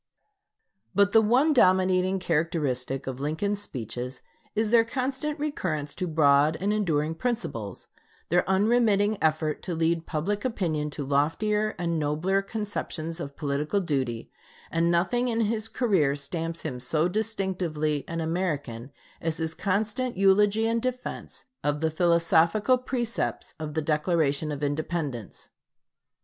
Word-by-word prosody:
But 200 +1 +4
the 225 - +6
one 255 +8 +4
dominating 185 -4 +4
characteristic 150 -7 -1
of 130 -1 -5
Lincoln's 180 +8 -1
speeches 125 - -6 0.3
is 215 0 +1
their 230 -1 +6
constant 265 +5 -2
recurrence 155 - -2
to 180 - -3
broad 150 -1 +4
and 200 +3 +1
enduring 160 -7 0
principles, 160 - -4 0.4
their 175 +2 +3
unremitting 210 0 +3
effort 155 -1 +1
to 175 - -3
lead 165 0 0
public 200 +7 -2
opinion 165 -11 -1
to 145 -1 -5
loftier 210 +10 +1
and 170 -2 -1
nobler 155 +7 +1
conceptions 195 -6 -4
of 140 -4 -7
political 150 +5 0
duty; 135 -10 -2 0.4
and 165 +1 +2
nothing 195 +9 +2
in 230 -1 0
his 220 0 0
career 185 - +2
stamps 165 +3 -4
him 130 -6 -4
so 155 +6 +1
distinctively 180 -8 -1
an 165 0 -3
American 145 -8 -2 0.3
as 160 -1 -2
his 160 -1 -2
constant 215 +6 -1
eulogy 205 +3 +4
and 230 0 +1
defense 255 0 -5 0.2
of 145 0 0
the 160 0 0
philosophical 170 +7 +3
precepts 240 -2 -2
of 155 -1 -5
the 160 - 0
Declaration 150 -1 +1
of 145 0 -4
Independence. 145 - -3
170 Hz, 135 wpm, -27 LUFS, 150-210 Hz, 0.4 s, the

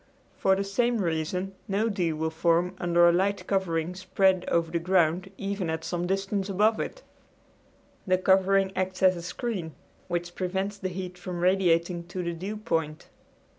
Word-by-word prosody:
For 190 0 +3
the 195 - -1
same 235 +5 +1
reason 180 +1 -2
no 205 +3 +1
dew 180 -7 0
will 160 +1 -1
form 170 +2 +2
under 175 -1 +4
a - - +6
light 195 +3 0
covering 175 -3 0
spread 185 0 +1
over 165 -1 +1
the 170 - 0
ground 180 +1 +2
even 200 -3 -3
at 160 0 -3
some 175 0 -2
distance 195 +1 -1
above 210 +3 +2
it. - - -5 1.0
The 185 0 +4
covering 190 +1 +3
acts 185 0 -2
as 185 -1 +6
a 170 - -6
screen, 180 - -4 0.3
which 175 -1 -3
prevents 190 +3 -2
the 185 - -2
heat 180 0 -6
from 175 -1 -5
radiating 175 -2 +2
to 180 +1 -4
the 170 0 -2
dew 195 +6 -5
point. 160 -8 -2
185 Hz, 170 wpm, -27 LUFS, 170-195 Hz, 1.0 s, a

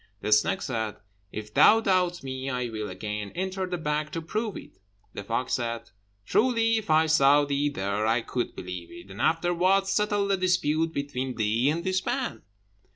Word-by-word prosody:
The 105 - -2
snake 105 - +3
said, 110 -5 -2 0.4
"If 105 0 -7
thou 220 - +7
doubt 185 -6 +1
me, 130 0 -4
I 125 -2 -2
will 110 -2 -4
again 105 +2 -5
enter 190 +1 -2
the 180 -1 -3
bag 150 -1 -2
to 165 - -3
prove 215 +4 -3
it." - - -13 0.3
The 100 - -6
fox 115 +5 -2
said, 115 -1 -3 0.3
"Truly 230 - +2
if 220 - -5
I 160 +1 +5
saw 145 -2 +5
thee 140 +1 0
there, 100 -3 -2
I 115 +1 +2
could 120 +1 -3
believe 90 -2 -7
it, 175 0 -12
and - - -7
afterwards 180 +4 +2
settle 205 0 +1
the 195 -1 +2
dispute 165 -3 +1
between 135 -3 -3
thee 115 +4 +1
and 165 +3 -1
this 185 0 0
man." 265 -3 -2
150 Hz, 180 wpm, -27 LUFS, 115-185 Hz, 0.4 s, thou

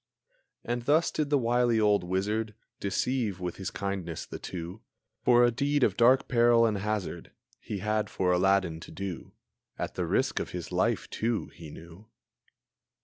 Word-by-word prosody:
And 120 0 -3
thus 155 +5 +3
did 150 -2 -1
the 145 - +4
wily 120 -2 +2
old 105 -2 +3
wizard 105 +4 -1 0.2
Deceive 105 -1 -1
with 90 -1 -4
his 95 - -4
kindness 95 -5 -4
the - - -8
two 90 +3 -7 0.4
For 120 -1 +5
a 120 - +3
deed 140 +3 +1
of 100 - +3
dark 125 +4 +4
peril 120 -1 +4
and 105 -3 0
hazard 105 -4 -4 0.3
He 105 - -5
had 105 +1 -1
for 90 -1 0
Aladdin 90 -2 +2
to - - -11
do, 95 -4 -6 0.4
At - - -4
the - - -2
risk - - +1
of - - -4
his - - -6
life, - - 0
too, 115 0 -1
he 80 -2 -11
knew. 85 +7 -13
105 Hz, 165 wpm, -28 LUFS, 95-120 Hz, 0.4 s, For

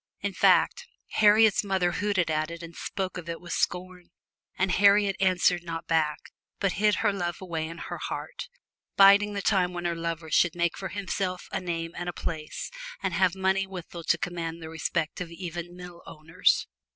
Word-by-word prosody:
In - - -2
fact, 485 -1 +3 0.2
Harriet's 215 0 +5
mother 190 -3 +1
hooted 190 -3 0
at 155 0 0
it 170 0 -8
and 170 0 -10
spoke 190 -2 -4
of 170 -1 -9
it 165 - -4
with 175 -1 -6
scorn; 180 0 -2 0.5
and 190 0 +1
Harriet 200 +1 +5
answered 185 -2 +3
not 165 -1 -6
back, 155 -2 +1 0.4
but 195 -2 +1
hid 210 +3 +2
her 205 - +4
love 175 -3 -3
away 165 -4 -3
in 165 +1 -8
her - - -6
heart - - -5 0.5
biding 200 +1 +7
the 200 -1 -3
time 185 -4 +2
when 175 0 -5
her 170 - +1
lover 165 -1 -4
should 175 +3 +3
make 170 -1 0
for 190 - -5
himself 190 -2 -3
a - - -2
name 165 -2 -3
and 175 0 -4
a - - -4
place, 155 - -5 0.3
and - - -1
have 185 -2 +2
money 190 +1 +1
withal 175 -2 -8
to - - +3
command 170 -2 -4
the 160 -1 -8
respect 160 +1 -2
of 175 - -4
even 175 0 -6
mill 180 -1 -10
owners. 160 +4 +1
180 Hz, 190 wpm, -27 LUFS, 170-195 Hz, 0.5 s, biding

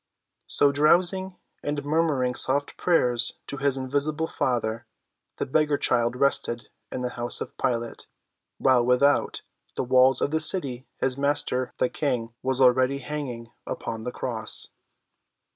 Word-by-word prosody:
So 145 - +3
drowsing 180 +6 +2 0.3
and 145 -1 -3
murmuring 145 -5 +1
soft 140 +3 +1
prayers 125 -9 +2
to 140 - -5
his 135 0 +1
invisible 145 +4 -1
Father, 115 -5 -1 0.5
the - - -1
beggar 150 +1 +2
child 120 -2 +1
rested 125 -3 0 0.2
in 125 - -4
the 125 - -1
house 120 0 -3
of - - -6
Pilate, 120 -1 -2 0.5
while 130 -2 +4
without 125 +4 +2 0.3
the - - -1
walls 130 +1 +4
of 145 - 0
the 160 - +1
city 140 -6 0
his 130 0 -1
Master, 140 -3 0
the - - +2
King, 125 -5 -2
was 130 0 0
already 130 +1 +4
hanging 130 -4 -6 0.2
upon 110 -1 -5
the 125 - -3
cross. 115 -3 -2
130 Hz, 140 wpm, -26 LUFS, 125-145 Hz, 0.5 s, while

